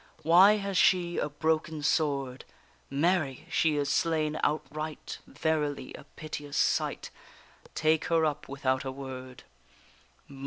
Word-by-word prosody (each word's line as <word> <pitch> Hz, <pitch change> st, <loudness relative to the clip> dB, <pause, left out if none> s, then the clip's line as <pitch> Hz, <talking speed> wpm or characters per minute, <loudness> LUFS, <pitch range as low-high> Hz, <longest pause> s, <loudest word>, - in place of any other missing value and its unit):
Why 180 Hz, +6 st, +7 dB
has 200 Hz, -2 st, -2 dB
she 175 Hz, -2 st, +3 dB
a 150 Hz, -, -1 dB
broken 155 Hz, +1 st, -1 dB
sword? 140 Hz, -5 st, 0 dB, 0.5 s
Mary! 145 Hz, -2 st, 0 dB
she 160 Hz, -2 st, +2 dB
is 145 Hz, -1 st, 0 dB
slain 155 Hz, +1 st, 0 dB
outright; 155 Hz, +1 st, -3 dB
Verily 150 Hz, -2 st, -2 dB
a -, -, -11 dB
piteous 145 Hz, -2 st, -6 dB
sight; -, -, 0 dB, 0.6 s
Take 155 Hz, 0 st, +2 dB
her 165 Hz, -1 st, +2 dB
up 150 Hz, -2 st, -3 dB
without 135 Hz, -1 st, -1 dB
a 135 Hz, -, -4 dB
word! 130 Hz, -1 st, -8 dB
150 Hz, 120 wpm, -29 LUFS, 140-160 Hz, 0.6 s, Why